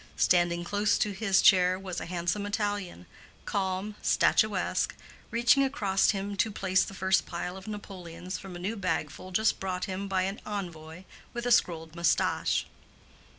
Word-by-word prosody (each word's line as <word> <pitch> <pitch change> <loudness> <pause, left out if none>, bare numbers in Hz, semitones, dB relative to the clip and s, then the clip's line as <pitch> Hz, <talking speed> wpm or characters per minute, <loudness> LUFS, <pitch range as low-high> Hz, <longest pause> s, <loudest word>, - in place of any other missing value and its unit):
Standing 175 -1 +3
close 205 +3 +1
to 210 - 0
his 195 0 +2
chair 185 -1 +6
was 190 -2 -5
a - - -6
handsome 175 +4 -2
Italian, 205 - -3 0.4
calm, 190 +1 -2
statuesque, 205 -4 +2 0.3
reaching 240 +4 +4
across 210 -9 +1
him 200 0 -1
to 220 - +1
place 185 -2 +2
the 195 - -7
first 190 +1 +2
pile 180 - -4
of 190 +1 -10
napoleons 185 -4 -7
from 190 -2 -9
a - - -5
new 190 +6 -3
bagful 185 -3 -3
just 220 +4 +2
brought 185 -1 -2
him 195 0 -4
by 190 -1 +1
an 195 +2 -3
envoy 175 -5 -6 0.3
with 240 0 -3
a 245 - +1
scrolled 165 -6 +2
mustache. 170 -2 +1
190 Hz, 155 wpm, -29 LUFS, 180-205 Hz, 0.4 s, chair